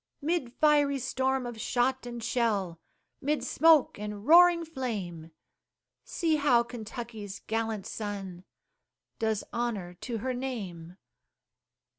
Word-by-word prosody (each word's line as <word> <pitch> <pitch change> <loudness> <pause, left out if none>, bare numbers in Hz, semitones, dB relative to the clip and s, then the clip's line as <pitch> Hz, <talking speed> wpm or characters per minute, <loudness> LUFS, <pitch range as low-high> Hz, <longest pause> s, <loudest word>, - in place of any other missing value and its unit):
'Mid 315 -5 -1
fiery 290 -2 +4
storm 260 0 -1
of 235 -2 -6
shot 255 0 0
and 240 -1 -6
shell, 200 -9 0 0.4
'Mid 295 +2 0
smoke 315 -8 +4
and 210 0 -6
roaring 340 +2 +7
flame, 205 - -5 0.7
See 325 -3 0
how 255 -5 +4
Kentucky's 225 -3 -7
gallant 225 -2 -2
son 195 -4 -5 0.8
Does 220 -2 0
honor 215 -7 -2
to 240 -3 -3
her 255 +4 -2
name! 190 -10 -5
240 Hz, 110 wpm, -29 LUFS, 205-265 Hz, 0.8 s, roaring